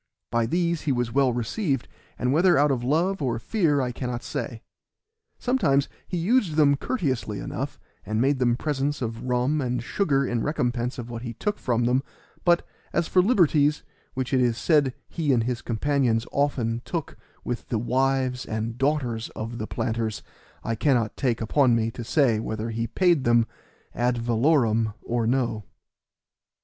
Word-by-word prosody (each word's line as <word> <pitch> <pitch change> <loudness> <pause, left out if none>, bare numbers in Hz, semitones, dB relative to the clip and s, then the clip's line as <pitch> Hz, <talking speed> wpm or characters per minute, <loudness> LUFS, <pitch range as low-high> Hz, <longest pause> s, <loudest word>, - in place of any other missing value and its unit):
By 115 -1 +1
these 170 +2 0
he 150 - 0
was 120 -2 0
well 135 0 +3
received, 135 - -1 0.3
but 125 +1 0
whether 175 +5 +4
out 145 +1 +4
of 125 -3 -1
love 165 +8 +1
or 125 -4 0
fear 150 - +1
I 125 -1 -1
cannot 125 -1 -4
say. 120 -5 -5 0.7
Sometimes 160 - +2 0.2
he 180 - -3
used 190 -1 +2
them 145 -2 +5
courteously 135 - -2
enough, - - -5 0.2
and 110 0 -2
made 135 +2 +2
them 120 -2 +3
presents 145 0 -1
of 115 0 -4
rum 125 +4 +1
and 125 -2 -2
sugar 140 -4 +1
in 120 -2 -1
recompense 125 -3 -1
of 120 -1 -6
what 115 -1 -5
he 120 -2 -6
took 205 - -2
from 120 -2 0
them; 125 +2 +2 0.4
but, 175 -1 +3 0.3
as 170 - +1
for 185 - +4
liberties, 160 - +3 0.3
which 130 +1 -3
it 130 - +4
is 120 -2 +2
said 145 -6 +2
he 155 -4 -1
and 115 -3 +2
his 125 +1 -2
companions 120 -1 +1
often 120 -5 0
took 165 -4 -4 0.3
with 120 -2 -4
the 115 - 0
wives 130 +2 0
and 110 +2 -4
daughters 135 -5 0
of 115 +2 -5
the 110 - -3
planters, 110 -1 -2 0.4
I 115 - -1
cannot 115 -2 +1
take 125 -4 0
upon 120 +2 +3
me 115 0 0
to 120 - -7
say 120 -4 +2
whether 110 +1 -3
he 115 +1 -2
paid 175 -4 +2
them 120 -1 +4 0.5
ad 120 +1 +1
valorem 115 -2 +2
or 115 -1 -1
no. 120 -4 0
125 Hz, 170 wpm, -25 LUFS, 115-145 Hz, 0.7 s, them